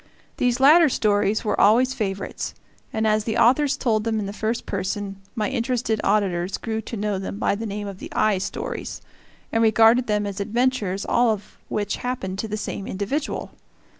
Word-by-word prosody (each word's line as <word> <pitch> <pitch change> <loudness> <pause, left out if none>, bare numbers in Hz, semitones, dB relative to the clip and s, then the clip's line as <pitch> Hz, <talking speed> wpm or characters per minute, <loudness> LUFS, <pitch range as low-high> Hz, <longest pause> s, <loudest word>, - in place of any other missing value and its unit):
These 245 0 +1
latter 305 +4 +7
stories 210 -2 +1
were 210 - +1
always 250 +5 +5
favorites, 195 -6 -4 0.4
and 220 0 -1
as 215 0 +2
the 220 -1 -1
authors 270 +4 +4
told 220 -4 +1
them 225 -1 0
in 205 - -2
the 200 - -5
first 220 +2 -2
person, 195 +1 -3 0.2
my 215 -3 0
interested 235 -3 -1
auditors 195 -3 +1
grew 220 -1 -3
to 225 +1 -6
know 205 -1 -1
them 195 +1 -5
by - - +1
the 220 +3 -4
name 205 0 -4
of 195 -2 -8
the - - -9
"I" 210 -3 +2
stories, 195 - -5 0.5
and 225 - +2
regarded 225 +2 +5
them 210 -1 +1
as 200 -1 -4
adventures 215 -2 0
all 240 0 +3
of 210 -2 -3
which 205 -1 -1
happened 195 -7 -4
to 220 - -2
the 215 0 -3
same 200 -1 -5
individual. 210 +11 -3
215 Hz, 185 wpm, -23 LUFS, 200-235 Hz, 0.5 s, latter